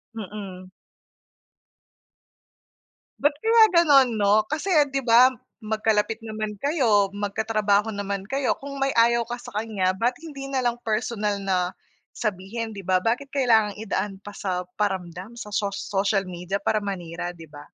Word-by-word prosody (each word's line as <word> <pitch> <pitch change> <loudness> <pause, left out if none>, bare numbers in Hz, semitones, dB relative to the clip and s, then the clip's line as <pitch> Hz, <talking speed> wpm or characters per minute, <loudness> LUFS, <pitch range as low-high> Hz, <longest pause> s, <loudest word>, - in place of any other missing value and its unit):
Mm. 195 -3 -8 2.5
Ba't 290 0 +3
kaya 450 0 +6
ganon 280 -8 +5
no? 210 +2 +4
Kasi 310 - -3 0.2
di 275 - +1
ba 245 +2 +6 0.2
magkalapit 220 0 0
naman 215 -1 -4
kayo 230 - +3
magkatrabaho 210 0 +1
naman 200 -2 -3
kayo 270 -1 +1
kung 280 0 -7
may 275 0 0
ayaw 235 0 +4
ka 240 0 -6
sa 245 - -9
kanya 210 -4 0
bat 240 +4 +1
hindi 285 -4 -8
nalang 255 -3 -1
personal 215 -2 -1
na, 185 -1 0 0.4
sabihin 215 +1 -4
di 195 - -8
ba? 185 -1 +2
Bakit 255 +7 -1
kailangang 225 -6 +3
idaan 195 -2 -3
pa 205 0 -10
sa 180 -2 -3
paramdam 190 0 -3
sa 220 -3 -8
so 200 -1 -1
social 195 -1 -1
media 180 +3 -4
para 215 - +1
manira 175 -3 -4
di 165 -3 -13
ba? 145 0 -12
215 Hz, 140 wpm, -24 LUFS, 195-240 Hz, 2.5 s, kaya